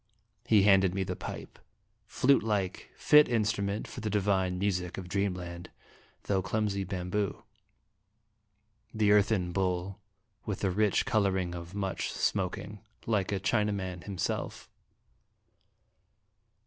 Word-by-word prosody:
He 105 -3 +5
handed 95 -2 +4
me 95 - 0
the 90 -1 -4
pipe - - -8 0.5
flute 135 +2 +3
like, 105 -4 -2
fit 150 0 +6
instru 110 -3 0
ment 100 +2 -3
for - - -8
the 110 - -2
divine 95 -3 +1
music 90 -2 -1
of 95 -2 -6
Dreamland, 90 -2 -3 0.5
though 95 -2 0
clumsy 100 0 -1
bamboo 95 +1 -3 1.5
the 105 -2 +2
earthen 105 -3 +3
bowl 95 +1 -1 0.4
with 105 -3 -4
the 95 - +1
rich 105 +1 +2
coloring 95 -7 +1
of 85 +2 -8
much 95 -3 -2
smoking, 100 +2 -2 0.3
like 105 -4 0
a 100 - 0
China 105 +1 +1
man 95 -3 -4
himself. 95 -4 -4
100 Hz, 120 wpm, -30 LUFS, 90-105 Hz, 1.5 s, fit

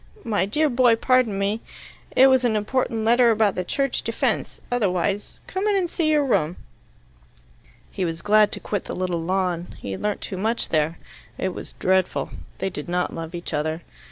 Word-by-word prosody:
My 205 -5 0
dear 300 +9 +2
boy, 245 -3 +4
pardon 245 -3 +2
me. 200 +3 0 0.5
It 260 - +8
was 260 -1 +5
an 235 -3 +2
important 220 +1 -1
letter 240 +1 +5
about 215 -3 +3
the 180 - -2
Church 275 +8 0
Defence, - - -1
otherwise. 200 -3 0
Come 380 +3 -2
in 415 - +3
and 360 -3 0
see 320 -2 0
your 300 -2 +3
room." 180 - +1 1.3
He 190 - -3
was 165 -1 -3
glad 210 0 +5
to - - -3
quit 205 -3 -3
the - - -5
little 180 -2 -1
lawn. 180 0 -1
He 100 - -6
had 95 - -5
learnt 210 -1 -1
too 190 - -5
much 225 +5 -1
there. 155 +1 +1 0.4
It 190 - -1
was - - -8
dreadful: 185 -1 0 0.3
they 190 - -2
did 150 -1 -6
not 180 0 0
love 165 +1 -6
each 170 -1 -6
other. 155 +2 -1
205 Hz, 185 wpm, -23 LUFS, 180-245 Hz, 1.3 s, It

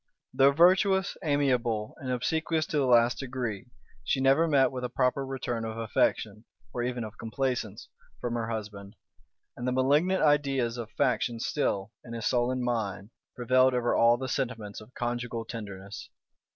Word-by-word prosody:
Though 135 +1 +5
virtuous, 190 +5 +4
amiable, 125 -8 0
and 130 - -7
obsequious 160 +5 0
to 160 -2 -2
the 135 - +1
last 120 0 +4
degree, 125 -4 -4 0.4
she - - 0
never 135 +5 +4
met 135 -4 +3
with 130 -1 -5
a 125 - -2
proper 130 +2 0
return 125 -3 -3
of 110 0 -5
affection, 110 -1 0 0.3
or 120 - -2
even 120 -1 -2
of 110 0 -9
complaisance, 115 -3 -3 0.3
from 120 -1 -3
her 115 -1 -2
husband; 105 -2 -6 0.6
and 120 - -5
the - - +1
malignant 145 +9 +2
ideas 135 -5 +2
of 115 -2 -6
faction 125 -3 0
still, 110 -6 -1
in 115 - -9
his 115 -1 -4
sullen 125 +1 +1
mind, 105 -4 -2 0.2
prevailed 130 +1 +3
over 120 -1 +1
all 115 +1 +5
the 130 +1 -4
sentiments 115 -7 -3
of 110 - -15
conjugal 120 -1 -3
tenderness. 100 -3 -8
125 Hz, 160 wpm, -28 LUFS, 115-135 Hz, 0.6 s, Though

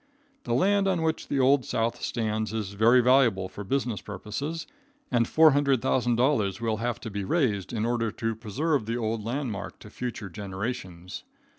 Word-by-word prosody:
The 120 - 0
land 195 +8 +3
on 180 -4 +1
which 160 0 -1
the 140 - 0
Old 135 +1 +4
South 115 +1 -1
stands 110 -2 -2
is 105 -3 -3
very 115 +5 +5
valuable 120 -7 +4
for 100 +2 -8
business 120 -2 -1
purposes, 110 - -5 0.5
and 120 -2 +2
$400,000 130 - +3
will 115 -2 -1
have 120 +1 -2
to 115 - -6
be 100 0 -3
raised 105 - 0
in 110 -2 -1
order 115 -1 0
to 115 0 -2
preserve 120 +4 -1
the 115 +1 -1
old 110 -2 -2
landmark 115 -4 -4
to 105 - -13
future 110 -6 -5
generations. 95 -2 -6
115 Hz, 160 wpm, -27 LUFS, 105-130 Hz, 0.5 s, very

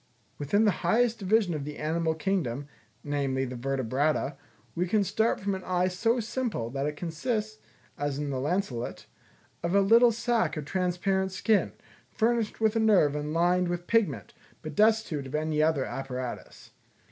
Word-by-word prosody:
Within 205 +10 +2
the 210 - +5
highest 230 +6 +2
division 200 -2 +2
of 150 -2 -3
the 150 +1 -7
animal 160 +1 0
kingdom, 155 -7 -2 0.4
namely, 135 -2 -1
the 125 0 -6
Vertebrata, 135 +3 0 0.4
we 180 +2 -1
can 205 +3 +2
start 220 +4 +1
from 200 0 -1
an 190 -1 -5
eye 180 0 +1
so 225 +7 +1
simple, 230 - -3
that 135 +2 -2
it 150 - -3
consists, 215 +6 -3 0.4
as 145 -1 -1
in 145 -1 -3
the 130 - -2
lancelet, 140 -5 -2 0.6
of 170 +3 -1
a - - +6
little 230 +4 +6
sack 230 -4 0
of 150 - -4
transparent 190 +3 0
skin, 205 +3 +1 0.4
furnished 230 -1 0
with 220 0 +2
a - - +2
nerve 195 -10 +4
and 150 0 -3
lined 175 +2 +2
with 175 0 -3
pigment, 175 - 0 0.3
but 155 - -6
destitute 215 -8 +2
of 130 - -5
any 155 0 0
other 155 -4 +2
apparatus. 130 -2 -6
175 Hz, 165 wpm, -28 LUFS, 145-215 Hz, 0.6 s, a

